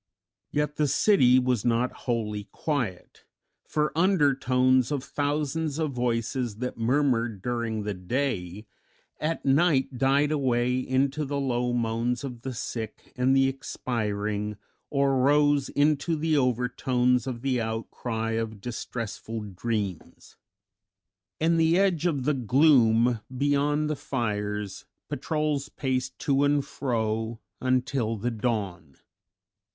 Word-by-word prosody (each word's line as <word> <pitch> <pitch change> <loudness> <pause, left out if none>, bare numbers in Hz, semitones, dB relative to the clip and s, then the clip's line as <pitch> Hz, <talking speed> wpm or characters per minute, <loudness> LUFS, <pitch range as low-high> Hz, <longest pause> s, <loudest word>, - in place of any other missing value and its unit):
Yet 150 0 -1
the 150 - +2
city 130 -6 +5
was 125 -4 +1
not 120 +1 +1 0.2
wholly 105 -3 -1
quiet, 125 - -3 0.4
for 150 0 0
undertones 130 -7 +3
of 140 -3 -1
thousands 150 +1 -1
of 155 -3 -1
voices 120 -1 -1
that 125 +3 -4
murmured 120 -4 +1
during 115 -3 -2
the 105 0 -2
day 100 -1 -3 0.5
at 160 0 -2
night 135 -3 +2
died 140 +3 +3
away 125 -3 +1
into 135 +3 0
the 140 0 -2
low 125 -2 0
moans 120 +1 -1
of 125 -4 -6
the 130 0 -5
sick 115 -2 -6
and 130 +1 +3
the 135 0 +4
expiring, 105 -5 -3 0.3
or 140 -2 +2
rose 145 0 +3
into 150 +3 +2
the 155 0 +1
overtones 125 -1 +1
of 120 -2 -5
the 130 -3 +1
outcry 110 0 -3
of 110 -1 -3
distressful 115 -1 -5
dreams. 100 -2 -4 1.0
In 165 +1 +3
the 165 +1 +4
edge 185 -4 +2
of 145 -6 -1
the 150 +3 +2
gloom 125 -3 +4 0.2
beyond 145 +2 +1
the 155 - -1
fires, 105 -6 -3 0.3
patrols 150 -2 -1
paced 130 -3 -2
to 140 -1 +2
and 145 -1 +2
fro 115 -3 -2 0.2
until 130 -3 0
the 120 +4 -2
dawn. 100 - -3
125 Hz, 120 wpm, -27 LUFS, 115-145 Hz, 1.0 s, city